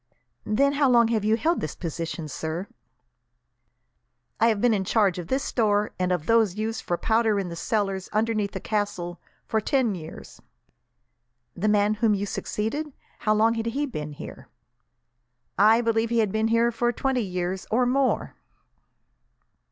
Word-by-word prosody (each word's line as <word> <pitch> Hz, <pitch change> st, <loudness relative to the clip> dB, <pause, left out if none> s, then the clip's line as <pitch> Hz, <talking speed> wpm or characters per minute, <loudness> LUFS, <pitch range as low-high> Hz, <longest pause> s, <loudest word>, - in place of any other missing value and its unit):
"Then 280 Hz, +6 st, +2 dB
how 280 Hz, -2 st, +3 dB
long 235 Hz, -2 st, +5 dB
have 220 Hz, -3 st, 0 dB
you 215 Hz, +1 st, +2 dB
held 330 Hz, +9 st, +1 dB
this 155 Hz, -, -4 dB
position, 165 Hz, -1 st, -5 dB
sir?" 160 Hz, +5 st, -4 dB, 1.7 s
"I 230 Hz, -, +5 dB
have 220 Hz, -3 st, +2 dB
been 240 Hz, +1 st, +3 dB
in 195 Hz, -2 st, 0 dB
charge 195 Hz, -2 st, +2 dB
of 170 Hz, -, -6 dB
this 265 Hz, +7 st, 0 dB
store, 210 Hz, -3 st, +1 dB
and 180 Hz, 0 st, 0 dB
of 175 Hz, -4 st, -1 dB
those 225 Hz, -5 st, +3 dB
used 220 Hz, +1 st, -2 dB
for 175 Hz, -, -2 dB
powder 220 Hz, 0 st, +2 dB
in 190 Hz, -3 st, -3 dB
the 170 Hz, -, -6 dB
cellars 195 Hz, 0 st, -2 dB
underneath 215 Hz, -1 st, 0 dB
the -, -, -4 dB
castle, 200 Hz, -5 st, -3 dB, 0.2 s
for 220 Hz, -, 0 dB
ten 250 Hz, -1 st, +1 dB
years." 160 Hz, -4 st, -10 dB, 1.1 s
"The 200 Hz, +5 st, -1 dB
man 210 Hz, 0 st, +3 dB
whom 220 Hz, -3 st, +4 dB
you 200 Hz, +1 st, -2 dB
succeeded 255 Hz, +9 st, -3 dB, 0.3 s
how 215 Hz, -1 st, +2 dB
long 225 Hz, +2 st, +3 dB
had 225 Hz, 0 st, -3 dB
he 280 Hz, +6 st, -1 dB
been 150 Hz, -, -6 dB
here?" -, -, -10 dB, 1.1 s
"I 220 Hz, +4 st, +5 dB
believe 230 Hz, -1 st, +1 dB
he 235 Hz, -, 0 dB
had 215 Hz, -4 st, +2 dB
been 220 Hz, +1 st, +1 dB
here 230 Hz, +1 st, +3 dB
for 240 Hz, +1 st, 0 dB
twenty 265 Hz, 0 st, -1 dB
years, 185 Hz, -2 st, -3 dB
or 245 Hz, +3 st, +2 dB
more." 265 Hz, +2 st, +1 dB
215 Hz, 165 wpm, -25 LUFS, 190-230 Hz, 1.7 s, long